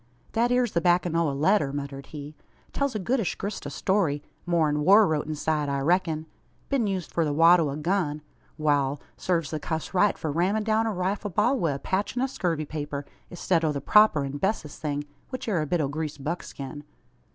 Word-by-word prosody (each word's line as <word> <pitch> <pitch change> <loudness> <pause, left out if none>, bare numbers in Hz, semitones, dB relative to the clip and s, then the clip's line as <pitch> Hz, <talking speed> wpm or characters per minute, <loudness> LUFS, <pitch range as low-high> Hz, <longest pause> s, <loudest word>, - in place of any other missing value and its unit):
"That 235 +2 +1
ere's 245 -2 +2
the 170 - +1
backin' 175 -1 +2
o' 165 -2 +2
a - - -1
letter," 145 +1 +2
muttered 140 -1 -6
he. 150 -1 -8 0.4
"Tells 280 -4 -1
a - - +2
goodish 225 0 0
grist 200 +1 -5
o' - - -4
story; 170 -7 0 0.2
more'n 160 -4 +2
war 205 +6 +7
wrote 155 -4 -1
inside, 155 -1 -1
I 140 0 0
reck'n. 160 0 +1 0.4
Been 265 -6 +1
used 190 -4 -3
for 170 - +1
the 150 - 0
wad' 165 +4 +6
o' 155 -3 +1
a 140 - -4
gun! 155 -2 -1 0.3
Wal; 145 -2 +1 0.2
sarves 170 -5 -1
the 155 - -2
cuss 160 +3 -4
right, 195 +2 +3
for 155 - -3
rammin' 185 +7 +1
down 220 +1 +1
a - - 0
rifle 195 +2 -2
ball 210 +8 +2
wi' 165 -6 +1
a - - -3
patchin' 205 - -1
o' - - +3
scurvy 170 - -2
paper, 145 -1 -5 0.3
i'stead 175 -1 0
o' 155 - +2
the 140 - -2
proper 210 -1 +5
an 140 +1 -4
bessest 190 -6 -2
thing, 145 -1 -2 0.3
which 255 -2 -6
air 190 -7 +1
a 155 - -2
bit 175 +3 +1
o' 150 - +1
greased 145 -1 -5
buckskin." 145 -2 -5
165 Hz, 210 wpm, -26 LUFS, 150-195 Hz, 0.4 s, war